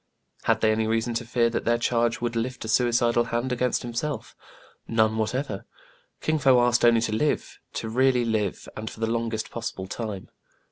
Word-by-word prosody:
Had - - +2
they 110 - +4
any 110 0 +1
reason 115 +1 0
to 115 +1 -2
fear 120 -1 +2
that - - -2
their 120 0 +2
charge 120 0 +1
would 120 -1 -2
lift 120 +1 -3
a - - -5
suicidal 120 0 +3
hand 120 +2 -2
against 125 0 0
himself.'* 120 +5 -4 0.5
None 110 -1 +2
what 110 +2 -1
ever. 130 -7 -3 0.5
Kin 155 0 +1
Fo 135 -3 +5
asked 120 0 +3
only 120 -1 +5
to 110 - -1
live, 145 +7 -1
to - - -3
really 125 +1 +3
live, 110 -4 -1
and 110 0 -5
for - - -12
the 115 - +1
longest 115 -1 -2
possible 95 -5 -5
time. 100 -1 -5
115 Hz, 190 wpm, -26 LUFS, 110-120 Hz, 0.5 s, Fo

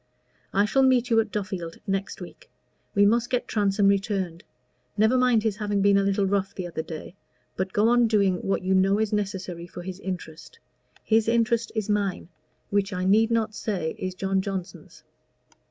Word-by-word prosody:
I 200 +1 +3
shall 270 +6 +2
meet 255 -2 +3
you 225 - +5
at 225 -1 0
Duffield 185 -5 -4
next 195 0 -3
week. - - -11 0.5
We 200 0 +5
must 235 +3 +2
get 250 -1 -1
Transome 200 -1 +2
returned. 195 -4 0 0.5
Never 220 +4 +4
mind 250 -4 +3
his 215 -3 -1
having 205 -2 -1
been 200 0 +5
a - - +3
little 195 0 +1
rough 195 0 -1
the 185 - -4
other 170 -2 -4
day, 160 +1 -8 0.4
but 190 0 -2
go 210 +2 +3
on 240 0 +4
doing 200 -4 +2
what 195 +1 -2
you 190 +1 +1
know 190 +1 +3
is 220 -1 -1
necessary 190 -4 -3
for 175 0 -9
his 185 +1 -7
interest. 185 - -7 0.5
His 220 0 +2
interest 230 0 +1
is 215 -2 -1
mine, 200 -5 -1 0.4
which 200 0 +1
I 185 -1 -2
need 220 +4 +4
not 225 -2 0
say 190 -7 -3
is 185 0 -4
John 190 0 0
Johnson's. 190 -2 -7
200 Hz, 185 wpm, -25 LUFS, 190-220 Hz, 0.5 s, you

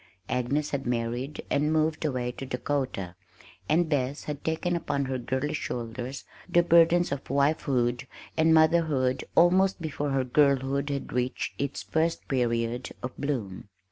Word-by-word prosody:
Agnes 135 +4 0
had 135 -3 -2
married 120 +4 -2
and 150 +2 +2
moved 155 0 +1
away 125 -5 -1
to 130 - -8
Dakota, 130 -8 -2 0.6
and 165 +2 +3
Bess 140 -2 -1
had 145 -1 -6
taken 160 +2 0
upon 145 -4 -1
her 130 -1 -2
girlish 130 +5 -2
shoulders 120 +2 -5 0.3
the 175 -1 +4
burdens 170 0 +5
of 140 -1 -4
wifehood 135 -3 +1 0.3
and 160 0 +4
motherhood 155 -5 +3
almost 185 +3 +4
before 150 -3 -3
her 135 -1 +1
girlhood 140 +1 +2
had 140 -1 -4
reached 125 +1 -1
its 140 -1 -3
first 165 +1 -1
period 120 -1 0
of 125 - -5
bloom. 110 -10 -3
140 Hz, 140 wpm, -27 LUFS, 125-155 Hz, 0.6 s, burdens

